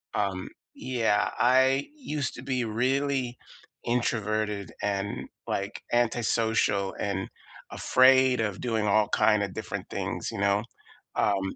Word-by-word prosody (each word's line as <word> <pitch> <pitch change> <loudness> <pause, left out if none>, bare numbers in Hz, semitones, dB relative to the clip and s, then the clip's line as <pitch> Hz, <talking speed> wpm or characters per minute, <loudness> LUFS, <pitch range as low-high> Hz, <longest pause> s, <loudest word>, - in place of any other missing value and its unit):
Um 95 -3 -1 0.3
yeah, 115 -5 0
I 130 +2 +3
used 150 - -3
to 120 - -8
be 130 -2 -1
really 130 +2 0 0.5
introverted 110 -4 -1
and, 100 0 -2 0.2
like, 100 +2 -3
antisocial 115 -4 +1
and 95 -2 -2 0.4
afraid 130 -1 +4
of 105 -4 -2
doing 110 -4 0
all 105 +1 +3
kinda 105 -2 +3
different - - -6
things, - - -3
you - - -6
know? 100 +1 +2 0.5
Um, 95 -2 0
110 Hz, 115 wpm, -27 LUFS, 100-130 Hz, 0.5 s, afraid